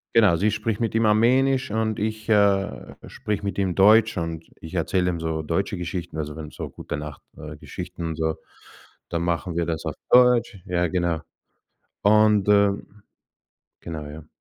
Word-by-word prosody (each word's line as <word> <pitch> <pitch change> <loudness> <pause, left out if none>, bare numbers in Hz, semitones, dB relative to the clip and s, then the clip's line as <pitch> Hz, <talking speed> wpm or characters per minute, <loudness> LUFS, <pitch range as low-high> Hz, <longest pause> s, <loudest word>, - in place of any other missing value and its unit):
Genau, 105 -7 +6
sie 100 +5 +1
spricht 105 0 -2
mit 115 -2 -1
ihm 115 -1 +2
Armenisch 130 +3 +3
und 110 -1 -1
ich, 110 +1 -3
äh, 100 - +2
spreche 105 -2 -4
mit 100 - -3
ihm 95 -3 0
Deutsch. 110 +4 +5
Und 80 -1 -4 0.2
ich 80 +3 -9
erzähle 90 +2 +1
ihm 85 -2 -3
so 80 -1 -2
deutsche 85 +6 -2
Geschichten, 85 -1 -5
also, 75 0 -4
wenn 80 -1 -8
so - - -7
gute - - -6
Nacht, 75 -1 -8
äh, - - -9
Geschichten 90 -1 -7
und 80 - -4
so, 80 0 -1 0.7
dann 85 0 -2
machen 85 0 -2
wir 85 -1 0
das 80 -2 -3
auf - - -3 0.2
Deutsch. 125 -4 +5
Ja, 90 -1 0
genau. 85 -2 -1 0.8
Und, 105 -1 +4
ähm 100 0 +2 0.8
Genau, 80 -3 -7
ja. 75 +1 -10
95 Hz, 170 wpm, -24 LUFS, 80-105 Hz, 0.8 s, Genau